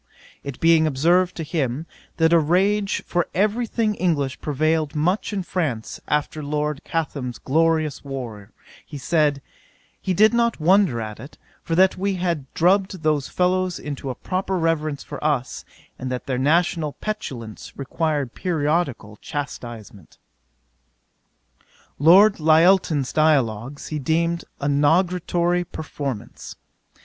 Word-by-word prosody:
It 140 -3 -7
being 165 -1 +4
observed 170 +6 +2
to 165 - -4
him, 150 -2 -2 0.3
that 165 0 +3
a 170 - +7
rage 195 +6 +1
for 175 -1 0
every 215 +5 +1
thing 220 -1 0
English 150 -9 -1
prevailed 155 +1 0
much 180 +9 0
in 200 -3 -2
France 145 -12 -3
after 150 +1 -1
Lord 150 0 -2
Chatham's 140 -7 -3
glorious 160 0 +1
war, 120 -7 -7 0.3
he 150 - -9
said, 145 -1 +1 0.6
he 185 - -1
did 215 +5 +5
not 235 -3 +1
wonder 180 - +3
at 110 -1 -6
it, 140 +7 -11 0.2
for 165 - -2
that 190 +2 +4
we 195 0 0
had 170 -7 -2
drubbed 190 0 +2
those 150 -3 +1
fellows 185 0 0
into 145 -2 -6
a 125 - -4
proper 190 +4 -2
reverence 155 -4 -1
for 145 - -8
us, 145 -5 -1 0.4
and 130 0 -4
that 125 - -4
their 130 -2 -2
national 160 +1 +1
petulance 130 - -6
required 145 -1 -2
periodical 150 - -1
chastisement. 120 - -7 1.8
'Lord 190 +8 +6
Lyttelton's 160 -2 +3
Dialogues, 140 -4 +1
he 155 - -3
deemed 170 +4 0
a 140 - -2
nugatory 175 +4 +2
performance. 140 -8 -6
155 Hz, 130 wpm, -22 LUFS, 140-180 Hz, 1.8 s, a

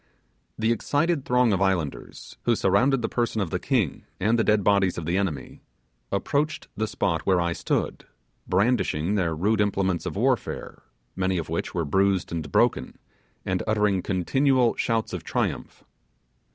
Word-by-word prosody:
The 110 +1 +1
excited 145 +5 0
throng 125 -3 +3
of 95 - 0
islanders, 90 -7 -2
who - - +3
surrounded 135 -1 +2
the - - +1
person 120 -2 -1
of 95 -5 -2
the 90 - -1
king 115 - 0 0.2
and 110 +5 +2
the - - +3
dead 105 -2 +2
bodies 100 -2 +2
of 85 - -4
the 85 +2 0
enemy, 90 -9 -3 0.5
approached 145 +10 -1
the 110 - -1
spot 85 -6 -1
where 95 -2 +4
I 85 0 0
stood, - - -2 0.4
brandishing 100 -4 +1
their 90 -6 0
rude 105 +6 +1
implements 95 -3 0
of - - -4
warfare, - - -1 0.3
many 95 0 0
of 80 - -4
which 80 - -3
were 85 -2 0
bruised 95 +4 +1
and 80 -4 -4
broken, - - +1 0.5
and - - -1
uttering 105 -3 +2
continual 125 - +2
shouts 115 -1 -1
of - - -4
triumph. - - -3
100 Hz, 160 wpm, -25 LUFS, 90-115 Hz, 0.5 s, where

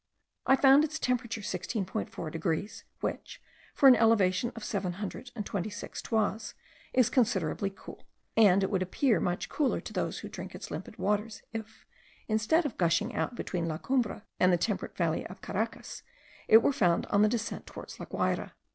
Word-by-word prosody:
I 265 - +7
found 270 +2 +6
its 315 +1 -2
temperature 235 -4 -1
16.4 190 -4 -4
degrees; 165 +5 -3 0.2
which, - - -4 0.4
for 275 - +6
an 260 - +10
elevation 225 -1 +3
of 230 - -8
seven 195 -4 -2
hundred 205 +6 -6
and 210 -3 -4
twenty 200 +1 -3
six 215 +3 -7
toises, 220 -1 -1 0.4
is 255 -3 +3
considerably 200 - +1
cool, 195 - -13 0.3
and 200 -3 +6
it 195 - -1
would 190 -2 +1
appear 220 +6 +2
much 175 0 -1
cooler 290 -4 0
to - - -9
those - - -2
who - - -6
drink - - -8
its - - -8
limpid - - -7
water, 210 +2 0 0.2
if, 225 -1 -7 0.4
instead 220 +10 +2
of 280 - -4
gushing 170 -2 +2
out 245 - -2
between 175 -7 -3
La 155 -1 -2
Cumbre 240 -1 -1 0.2
and 185 - +5
the 175 - +4
temperate 205 +4 -2
valley 165 -2 0
of 185 - -12
Caracas, 220 +4 -4 0.5
it 225 +1 +8
were 280 - +3
found 175 -8 +2
on 205 - +4
the 215 - +5
descent 230 -1 -3
towards - - -9
La - - -7
Guayra. - - -1
210 Hz, 180 wpm, -30 LUFS, 185-235 Hz, 0.5 s, an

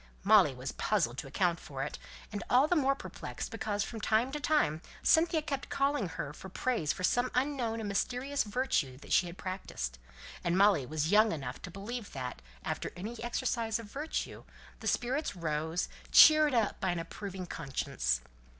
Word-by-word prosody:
Molly - - +6
was - - -5
puzzled 120 +2 0
to 145 - -6
account 170 +4 +1
for 135 -2 -5
it; 145 - -5 0.3
and 205 -1 -4
all 260 +4 +5
the 355 - +2
more 275 -3 +3
perplexed - - -7
because 210 -3 -1
from 225 -2 -6
time 225 +5 +2
to 295 - -3
time 285 - +2 0.2
Cynthia 320 -1 +4
kept 280 -3 -4
calling 275 -5 +1
upon 165 - -7
her 145 0 -4
for 190 - -10
praise 190 - 0
for 185 - -5
some 245 +6 +2
unknown 250 -4 0
and 220 - -3
mysterious 250 +7 0
virtue 205 - 0
that - - -5
she 180 - +4
had 170 +1 -9
practised; 60 - -5 0.4
and 175 0 +1
Molly 195 -9 +4
was 155 +3 -1
young 215 +1 +6
enough 135 -5 -5
to - - -7
believe 205 +5 -6
that, 125 - -5 0.2
after - - -3
any 220 +7 -6
exercise 235 -2 -1
of 225 -3 -10
virtue, 300 +3 -4 0.4
the - - -5
spirits 260 0 0
rose, 160 0 -1 0.2
cheered 310 -3 +8
up 225 -3 +1
by 190 - 0
an 175 - 0
approving 185 +2 -6
conscience. 95 - -1
205 Hz, 180 wpm, -32 LUFS, 165-255 Hz, 0.4 s, cheered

